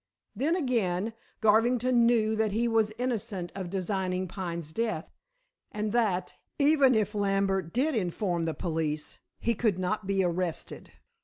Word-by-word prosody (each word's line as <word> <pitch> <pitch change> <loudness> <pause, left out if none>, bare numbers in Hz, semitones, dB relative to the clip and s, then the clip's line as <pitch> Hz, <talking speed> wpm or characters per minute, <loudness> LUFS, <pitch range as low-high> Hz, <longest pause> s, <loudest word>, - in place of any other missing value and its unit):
Then, 290 - +1
again, 225 - 0 0.3
Garvington 235 +2 +4
knew 220 -2 +3
that 215 -2 0
he 235 +3 +1
was 225 -2 +2
innocent 210 -8 -3
of 190 -3 -5
designing 185 -1 -1
Pine's 170 -4 -5
death, 215 -4 -2 0.6
and 210 0 -2
that, 200 -6 0 0.2
even 280 -3 +5
if 210 -1 +1
Lambert 195 -3 0
did 285 - +1
inform 180 -4 -1
the 160 - -2
police, 155 -3 -3 0.2
he 235 - +1
could 215 -4 +1
not 190 +2 -2
be 195 -1 +2
arrested. 175 -1 -3
205 Hz, 140 wpm, -29 LUFS, 180-230 Hz, 0.6 s, even